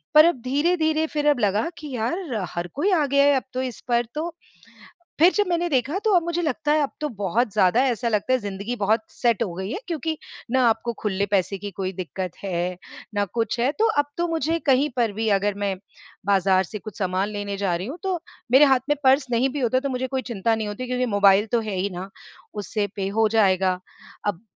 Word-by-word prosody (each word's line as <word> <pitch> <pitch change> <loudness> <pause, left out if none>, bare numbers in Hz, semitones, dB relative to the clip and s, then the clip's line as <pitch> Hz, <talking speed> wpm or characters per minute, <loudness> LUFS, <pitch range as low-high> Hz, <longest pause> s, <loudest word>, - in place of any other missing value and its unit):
पर 305 +1 +9
अब 335 -8 +1
धीरे-धीरे 315 +4 +1
फिर 295 -1 -1
अब 285 -4 +2
लगा 210 +5 +1
कि 300 -3 -8
यार, 260 - -2 0.2
हर 175 +1 -4
कोई 345 +9 +1
आ 320 -5 +3
गया 280 +1 +4
है 285 - +5
अब 260 - 0
तो 255 - -1
इस 255 -3 -4
पर। 240 -1 +2
तो 320 +3 -2 0.9
फिर 345 +4 +7
जब 415 -2 +2
मैंने 345 0 0
देखा, 280 +4 0
तो 435 0 +1
अब 345 - +4
मुझे 340 +1 -1
लगता 295 0 0
है, 305 - +3
अब 280 - -2
तो 300 - 0
बहुत 215 +5 +1
ज़्यादा 190 +7 +4
ऐसा 240 -1 0
लगता 215 +3 +1
है 255 - +3
ज़िंदगी 205 +2 -4
बहुत 215 0 +1
सेट 235 -2 +1
हो 185 -6 -4
गई 190 +3 -4
है - - -3
क्योंकि 320 -2 -2 0.3
ना 260 +1 +3
आपको 230 +1 -1
खुले 200 -1 0
पैसे 195 0 +1
की 205 +1 -6
कोई 190 0 -3
दिक्कत 185 0 -5
है, 180 -1 -2 0.4
ना 205 0 +2
कुछ 230 +4 -2
है। 250 +4 +2
तो 450 - +4
अब 290 - +3
तो 345 0 0
मुझे 325 0 0
कहीं 275 +3 +4
पर 235 -3 +2
भी, 220 +2 -2
अगर 205 +1 0
मैं 195 -1 0 0.5
बाज़ार 190 -1 +3
से 210 +4 -7
कुछ 215 -1 -10
सामान 190 +1 0
लेने 205 -1 -4
जा 195 -3 0
रही 180 +4 -4
हूँ, 285 +7 -6
तो 375 -2 -1 0.3
मेरे 275 +3 +8
हाथ 265 -2 +4
में 295 - +4
पर्स 265 +1 +4
नहीं 245 +3 +2
भी 285 +2 -4
होता 250 +1 +2
है, - - +1
तो 280 - -2
मुझे 260 0 -2
कोई 265 0 -2
चिंता 225 +2 +1
नहीं 220 -1 -3
होती 210 +5 -5
क्योंकि 250 0 0
मोबाइल 200 +1 +5
तो 235 - +2
है 215 -3 -4
ही 195 +2 0
ना। 185 +1 -7 0.4
उससे 205 0 -2
पे 195 -1 -2
हो 220 - +5
जाएगा। 190 -3 +3 0.5
अब 205 +2 -3
235 Hz, 230 wpm, -24 LUFS, 200-290 Hz, 0.9 s, पर